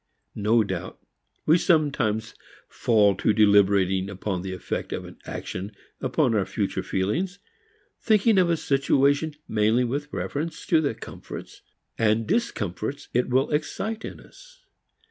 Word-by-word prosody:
No 110 +2 +3
doubt 95 -2 -5 0.5
we 160 +3 +5
sometimes 135 - +1 0.3
fall 105 -4 +3
to 110 - +2
deliberating 100 -2 +4
upon 95 -1 -3
the 95 +1 -5
effect 95 - -4
of - - -6
action 100 +3 -5 0.3
upon 130 -1 +1
our 105 -3 +2
future 100 +1 -2
feelings, 165 - -1 0.6
thinking 215 -1 +4
of 180 -2 +3
a 170 - +2
situation 140 +2 +2
mainly 110 +3 +2
with 145 +4 -3
reference 155 +2 -4
to 160 -2 +3
the 140 -7 -1
comforts - - -9 0.4
and 110 0 +2
discomforts 140 - -2
it 125 +1 +1
will 130 +2 +2
excite 215 +9 -2
in - - -7
us. - - -18
125 Hz, 130 wpm, -25 LUFS, 105-155 Hz, 0.6 s, we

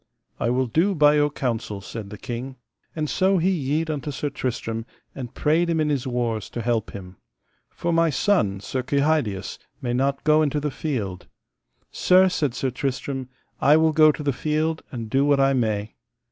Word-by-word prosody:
I - - 0
will 130 +2 +1
do 170 - +1
by 150 -1 +5
your 150 0 +3
counsel, 115 -7 -3
said 100 +1 -8
the 105 - -8
king. 125 +5 -6 0.4
And 155 -2 -1
so 190 +4 +2
he 180 +3 +2
yede 155 -1 -1
unto 150 -1 -4
Sir 145 +1 -3
Tristram, 115 -4 -3 0.3
and 125 -2 -8
prayed 165 +3 +2
him 165 -1 +1
in 155 -1 +1
his 140 -3 -1
wars 120 -4 -2
to 120 - -5
help 115 -3 0
him: 90 -2 -10 0.5
For 170 0 -2
my 165 0 +3
son, 135 - +1
Sir 130 +4 -3
Kehydius, 140 -7 0 0.2
may 120 -2 -2
not 135 +2 0
go 155 0 +4
into 150 -1 +1
the 150 0 -2
field. 110 - -4 0.6
Sir, 185 +1 +4
said 145 -8 -1
Sir 130 +1 -1
Tristram, 135 0 -3 0.3
I 150 +2 +5
will 160 0 +3
go 155 0 +6
to 150 - -7
the 140 -1 +1
field 155 +4 -1
and 115 -5 -5
do 135 +5 +2
what 145 -1 +3
I 135 0 +4
may. 110 -4 -1
140 Hz, 190 wpm, -24 LUFS, 120-155 Hz, 0.6 s, go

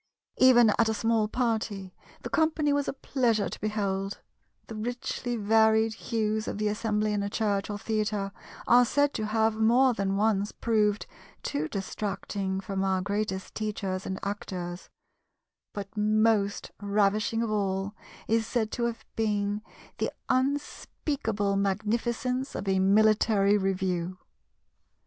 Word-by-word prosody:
Even 240 -4 +7
at 225 -1 +4
a 220 - 0
small 225 0 +1
party, 220 -5 -2 0.3
the - - -4
company 315 -2 +2
was 285 -1 0
a - - -1
pleasure 240 -6 0
to - - -8
behold; 200 -2 -2 0.5
the - - -9
richly 240 +2 -3
varied 220 +1 +3
hues 220 -1 -2
of - - -3
the 210 0 0
assembly 210 0 0
in 205 - 0
a 200 - -2
church 205 -2 -1
or 205 - -3
theatre 210 -2 -1 0.3
are 245 +1 +6
said 285 +4 +2
to 215 - -2
have 220 0 +1
more 245 +4 +4
than 195 -2 -1
once 205 -1 +1
proved 210 -3 +1 0.4
too 150 +2 -2
distracting 195 0 -3
from 195 0 -3
our 190 -1 +1
greatest 200 0 -3
teachers 195 -3 -3
and 190 - -3
actors; 180 -3 -5 0.8
but 200 +1 -7
most 215 -1 +2
ravishing 210 +2 +1
of 225 - -2
all 195 -1 -1 0.3
is 225 0 +1
said 220 -3 -1
to 240 - -1
have 230 -2 -4
been 210 -1 0 0.4
the - - 0 0.2
unspeakable 260 -5 -1
magnificence 230 +6 -1
of 200 - -4
a 190 -1 +2
military 205 +1 +4
review. 185 -2 -1
215 Hz, 135 wpm, -28 LUFS, 200-225 Hz, 0.8 s, Even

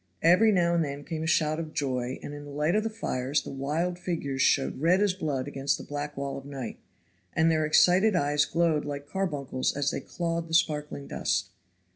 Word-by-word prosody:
Every 185 +7 +6
now 175 -3 +3
and 170 -1 +2
then 140 -1 -5
came 160 +1 -4
a 160 - -2
shout 155 -1 +2
of 160 -1 -6
joy, 130 -2 -1
and, 145 - -6
in 145 0 -8
the 145 - -10
light 150 +4 0
of 215 - +3
the 225 - -2
fires, 145 - -1
the - - -7
wild 155 +6 -2
figures 145 -7 -2
showed 135 -1 +2
red 175 +4 +4
as 205 -2 +3
blood 145 -7 -2
against 140 0 -1
the - - -9
black 145 0 -5
wall 140 0 -3
of - - -14
night, 135 -4 -6 0.5
and 160 +1 +3
their 155 -1 +1
excited 185 +6 +5
eyes 145 -3 +2
glowed 165 -2 +1
like 145 -1 -5
carbuncles 145 -8 -2
as 145 0 +1
they - - -3
clawed 170 -1 -3
the 165 - -1
sparkling 150 -3 0
dust. - - -1
150 Hz, 210 wpm, -28 LUFS, 140-170 Hz, 0.5 s, Every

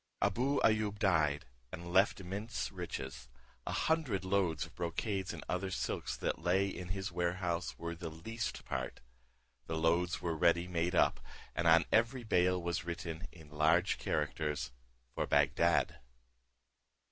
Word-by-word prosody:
Abou 125 +8 +2
Ayoub 110 -2 +3
died, 80 -8 +2 0.3
and 85 +1 -7
left 95 +3 +4
immense 100 +5 -4
riches: 65 -1 -6 0.4
a - - -1
hundred 140 -13 +1
loads 90 -5 +1
of 80 - -15
brocades 95 +3 -2
and - - -7
other 90 +1 -1
silks 90 - -2
that - - -2
lay 95 +3 +3
in 90 -2 -5
his 95 0 -3
warehouse 85 0 -1
were 85 0 -4
the 85 0 -6
least 110 +9 -5
part. 65 -1 -3 0.7
The 80 - -2
loads 85 +3 +2
were 85 -2 -1
ready 85 +2 +3
made 90 0 0
up, - - +4 0.4
and 85 - +1
on 80 -1 +7
every 115 +3 +3
bale 90 -3 +3
was 85 -1 -2
written 85 -1 -5
in 80 -4 -14
large 80 +5 +3
characters, 75 -2 -1 0.4
"For - - -1
Bagdad." - - +3
90 Hz, 145 wpm, -34 LUFS, 80-95 Hz, 0.7 s, on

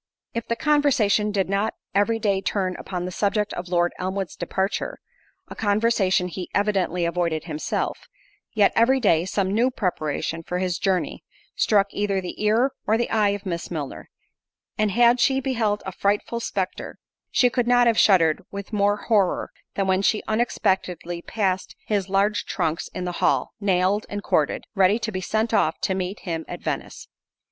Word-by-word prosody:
If 230 -1 -4
the 235 - 0
conversation 245 -9 +2
did 195 -2 0
not 200 +3 0 0.2
every 205 +3 +2
day 200 -3 0
turn 185 -2 -1
upon 180 -2 -4
the 180 - -4
subject 205 +2 0
of 175 - -5
Lord 175 -1 +2
Elmwood's 190 -2 -3
departure—a 215 - -5
conversation 205 -4 +2
he 180 0 -6
evidently 190 -4 +1
avoided 170 -2 -1
himself—yet, 200 - -2
every 255 +4 +4
day, 170 -8 +3
some 195 0 -1
new 235 +4 +3
preparation 165 - -2
for 180 +2 -4
his 180 -2 -1
journey, 190 -3 -1 0.3
struck 205 -2 +3
either 200 -1 0
the 185 +3 -6
ear 230 +6 +3 0.2
or 220 - +3
the 240 - -1
eye 215 -2 +3
of 200 0 -3
Miss 170 -2 -4
Milner—and 170 +6 -6
had 240 +3 +4
she 265 +1 +3
beheld 230 -6 -1
a 190 - -4
frightful 205 +5 -1
spectre, 195 -5 -4 0.3
she 245 -1 +3
could 245 -1 0
not 245 0 +5
have 230 -2 +3
shuddered 165 -6 +4
with 200 +2 -8
more 205 0 +2
horror, 205 -4 +1 0.2
than 195 - 0
when 190 0 +2
she 210 +2 +1
unexpectedly 185 -6 -1
passed 190 -2 -2
his 200 -3 -1
large 200 +2 +1
trunks 160 +1 -1
in 180 - -6
the 180 - -2
hall, 135 -2 +2
nailed 195 +1 +1
and 205 0 -5
corded, 150 - +1
ready 195 0 +4
to 225 -1 -3
be 185 -2 -3
sent 220 +4 -1
off 160 -7 +2
to 190 - 0
meet 190 +2 -3
him 165 -3 -3
at - - -6
Venice. - - -5
200 Hz, 165 wpm, -24 LUFS, 180-220 Hz, 0.3 s, not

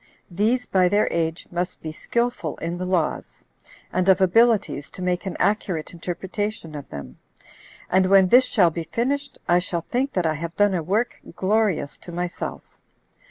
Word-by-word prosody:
These, 220 +8 +1
by 185 -2 +3
their 205 +2 +3
age, 165 0 -1
must 175 +1 -3
be 155 - -4
skillful 235 -2 -2
in 170 +1 -4
the 185 - -3
laws, 180 -4 -2 0.5
and 185 +1 +2
of 190 - +6
abilities 195 -5 +3
to - - -10
make 180 +1 -1
an 190 - -4
accurate 190 -7 0
interpretation 180 +1 -4
of 145 -2 -8
them; 70 -3 -9 0.7
and 185 0 +3
when 190 -1 +6
this 255 +4 +7
shall 180 -7 +3
be 165 +1 -4
finished, 280 - -2
I 175 0 +5
shall 175 -1 -2
think 260 - -2
that 180 -2 0
I 160 - +2
have 165 +2 -5
done 205 -1 +4
a 175 - 0
work 205 +9 -1
glorious 195 -6 0
to 175 - -10
myself. 175 0 -4
185 Hz, 170 wpm, -23 LUFS, 170-210 Hz, 0.7 s, this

